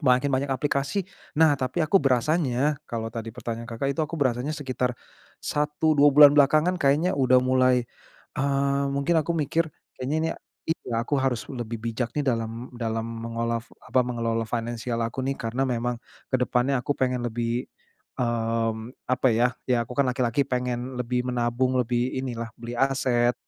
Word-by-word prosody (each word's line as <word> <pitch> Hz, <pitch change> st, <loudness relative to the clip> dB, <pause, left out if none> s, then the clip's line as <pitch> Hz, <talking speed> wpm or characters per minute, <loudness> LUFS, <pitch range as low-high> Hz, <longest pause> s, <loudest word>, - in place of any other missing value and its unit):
makin 135 Hz, -1 st, +3 dB
banyak 135 Hz, +2 st, 0 dB
aplikasi. 140 Hz, +6 st, 0 dB, 0.3 s
Nah, 160 Hz, -1 st, +6 dB
tapi 155 Hz, +6 st, 0 dB
aku 190 Hz, +5 st, +4 dB
berasanya 140 Hz, +1 st, +1 dB
kalau 115 Hz, -1 st, -4 dB
tadi 115 Hz, -1 st, -5 dB
pertanyaan 115 Hz, 0 st, -6 dB
Kakak 135 Hz, +4 st, -1 dB
itu 140 Hz, -, -3 dB
aku 155 Hz, +1 st, -2 dB
berasanya 135 Hz, +1 st, 0 dB
sekitar 130 Hz, -3 st, -2 dB, 0.5 s
1, 150 Hz, +1 st, +1 dB
2 145 Hz, -1 st, +6 dB
bulan 145 Hz, 0 st, +8 dB
belakangan 155 Hz, +5 st, +4 dB
kayaknya 145 Hz, +6 st, +3 dB
udah 130 Hz, -2 st, +4 dB
mulai, 130 Hz, -1 st, +3 dB, 0.6 s
eee, 140 Hz, 0 st, +1 dB
mungkin 140 Hz, +4 st, +2 dB
aku 165 Hz, +2 st, -2 dB
mikir, 160 Hz, +2 st, +1 dB, 0.3 s
"Kayaknya 135 Hz, +4 st, -1 dB
ini 160 Hz, -, 0 dB, 0.3 s
iya 120 Hz, -8 st, -2 dB
aku 145 Hz, -, -1 dB
harus 130 Hz, -3 st, 0 dB
lebih 120 Hz, -2 st, -4 dB
bijak 115 Hz, +1 st, -3 dB
nih 145 Hz, -, +1 dB
dalam 115 Hz, 0 st, -2 dB
dalam 115 Hz, 0 st, -1 dB
mengola 115 Hz, 0 st, -3 dB
fu 115 Hz, -, -21 dB
apa, 130 Hz, -, +2 dB
mengelola 115 Hz, -2 st, -1 dB
finansial 115 Hz, 0 st, -3 dB
aku 115 Hz, +3 st, -3 dB
nih." 135 Hz, 0 st, -1 dB
Karena 120 Hz, +4 st, -1 dB
memang 120 Hz, 0 st, -1 dB, 0.4 s
ke -, -, +5 dB
depannya 125 Hz, +1 st, +1 dB
aku 145 Hz, -, 0 dB
pengen 125 Hz, -1 st, 0 dB
lebih, 120 Hz, +1 st, -2 dB, 0.5 s
mmm, 115 Hz, -1 st, -1 dB, 0.2 s
apa 130 Hz, +1 st, +3 dB
ya, 125 Hz, +2 st, +3 dB, 0.2 s
ya 120 Hz, -2 st, +2 dB
aku 120 Hz, -, -9 dB
kan 140 Hz, -2 st, +3 dB
laki-laki 125 Hz, +1 st, +1 dB
pengen 125 Hz, 0 st, -2 dB
lebih 125 Hz, +1 st, -1 dB
menabung, 125 Hz, +1 st, 0 dB
lebih 120 Hz, +1 st, 0 dB
inilah 120 Hz, -3 st, -4 dB
beli 120 Hz, 0 st, -7 dB
aset, 125 Hz, -3 st, +2 dB
125 Hz, 165 wpm, -26 LUFS, 120-140 Hz, 0.6 s, bulan